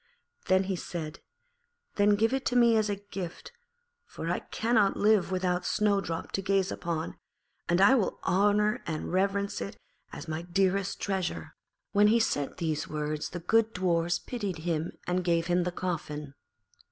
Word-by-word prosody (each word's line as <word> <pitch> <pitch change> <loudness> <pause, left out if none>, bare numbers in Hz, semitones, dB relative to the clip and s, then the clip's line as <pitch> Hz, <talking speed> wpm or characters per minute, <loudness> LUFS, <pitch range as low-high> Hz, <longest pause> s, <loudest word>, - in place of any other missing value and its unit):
Then 185 +1 +4
he 190 0 -2
said, 165 -2 -6 0.7
'Then 205 0 +4
give 225 +4 +2
it 270 0 0
to 250 - -1
me 235 -2 +6
as 215 -1 +2
a 205 - 0 0.2
gift, 180 -3 -6 0.6
for - - -4
I - - 0
cannot 220 -3 +1
live 210 -3 +3
without 180 -1 0
Snowdrop 195 -5 0
to 195 - -1
gaze 195 0 +1
upon; 165 -1 -4 0.5
and 175 +1 +3
I 200 +7 +7
will 235 -7 +1
honour 205 +2 +2
and 160 +1 -3
reverence 200 +1 0
it 200 - -5 0.3
as - - -8
my 160 +1 -3
dearest 190 +2 0
treasure.' 190 -3 -3 0.4
When 205 0 +5
he 220 - +4
had 230 - +3
said 145 -8 -2
these 160 -4 -2
words 150 0 -3
the 175 - -6
good 225 +5 +2
Dwarfs 175 -2 +1
pitied 205 -8 -4
him 165 -1 -2
and 180 +1 0
gave 170 -1 +1
him 175 0 +1
the 180 - -1
coffin. 150 -5 -4
185 Hz, 165 wpm, -29 LUFS, 170-205 Hz, 0.7 s, I